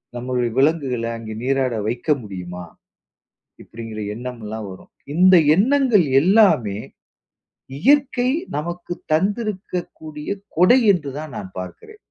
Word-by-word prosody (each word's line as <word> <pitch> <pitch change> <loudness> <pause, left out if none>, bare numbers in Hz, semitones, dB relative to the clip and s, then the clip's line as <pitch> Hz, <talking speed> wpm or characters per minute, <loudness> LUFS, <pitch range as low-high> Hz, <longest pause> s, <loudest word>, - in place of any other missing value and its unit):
நம்மளுடைய 125 -1 -2
விலங்குகள 135 -5 +1
அங்க 110 -1 -8
நீராட 135 -1 0
வைக்க 120 +6 -4
முடியுமா? 90 -3 -7 1.0
இப்படிங்கிற 115 -1 -8 0.2
எண்ணம்ல்லாம் 110 -3 -6
வரும். 95 - -14 0.2
இந்த 185 +3 +6 0.2
எண்ணங்கள் 240 - +3 0.2
எல்லாமே 180 - +4 1.0
இயற்கை 265 - +3 0.3
நமக்கு 175 +3 -5 0.2
தந்திருக்கக்கூடிய 185 -5 -3 0.3
கொடை 185 +10 +6
என்று 150 -6 -3
தான் 155 -2 -7
நான் 95 - -7
பார்க்கிறேன். 425 - -10
150 Hz, 100 wpm, -21 LUFS, 115-190 Hz, 1.0 s, இந்த